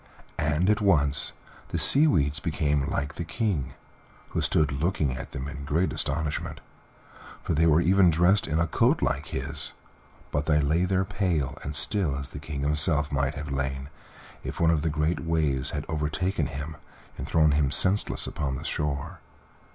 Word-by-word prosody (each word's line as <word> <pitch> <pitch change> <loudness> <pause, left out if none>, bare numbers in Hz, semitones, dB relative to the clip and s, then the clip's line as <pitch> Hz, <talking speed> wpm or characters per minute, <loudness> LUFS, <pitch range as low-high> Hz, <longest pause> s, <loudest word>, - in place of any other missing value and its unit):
And 75 +4 +1
at 105 - 0
once 75 -8 +2 0.3
the - - -3
sea 150 +3 +6
weeds 75 - +1
became 75 -4 -1
like 70 +1 -2
the 85 - -3
King, 80 - -2 0.5
who - - -2
stood 75 -3 +1
looking 75 -2 -1
at - - -7
them 70 0 -6
in 70 -1 -7
great 80 +6 0
astonishment, 75 +1 -2 0.8
for - - -1
they 80 +2 +3
were 80 +1 +4
even 95 +1 +4
dressed 90 +4 +3
in 80 0 -1
a 85 - +2
coat 80 - +1
like - - -1
his, - - -5 0.6
but 75 +1 -2
they 75 -1 +3
lay 80 +5 +1
there 95 +1 0
pale 85 -8 -1
and 70 +1 -6
still 90 -5 +3
as 70 0 -6
the 70 - -7
King 75 -1 -6
himself 75 0 +3
might 70 0 -1
have 75 -1 -6
lain 65 0 -3 0.5
if - - -6
one 85 -1 +4
of 80 -3 +1
the 80 - 0
great 75 +3 -1
waves 75 -5 0
had - - -4
overtaken 80 +2 -1
him 75 +2 -7 0.4
and 65 - -7
thrown 80 -2 +3
him 70 -1 +2
senseless 95 +7 +3
upon 70 -3 -3
the 75 +5 -7
shore. 75 -4 -3
75 Hz, 175 wpm, -26 LUFS, 70-85 Hz, 0.8 s, sea